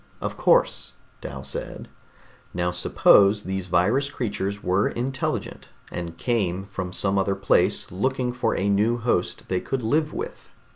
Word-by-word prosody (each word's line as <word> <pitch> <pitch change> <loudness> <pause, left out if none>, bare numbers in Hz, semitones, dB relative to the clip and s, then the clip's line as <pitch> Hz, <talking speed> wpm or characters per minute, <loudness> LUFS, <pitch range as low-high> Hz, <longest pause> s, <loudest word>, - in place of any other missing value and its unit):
"Of - - -4
course," - - +2 0.3
Dal 65 -1 -7
said. 65 - -5 0.7
"Now 90 0 0
suppose 100 +3 +4
these 95 -1 -3
virus 105 +11 +2
creatures 105 -6 -3
were 95 +3 +2
intelligent, 135 +3 -3 0.2
and 85 -1 -6
came 95 -6 -1
from 95 -2 -5
some 95 +1 +1
other 95 0 0
place - - +2
looking 125 +5 -1
for 115 -2 0
a 100 - 0
new 105 +4 +2
host 115 -7 -1
they 95 -1 -1
could 135 -3 -3
live 150 +6 +1
with. - - -7
100 Hz, 145 wpm, -24 LUFS, 90-120 Hz, 0.7 s, suppose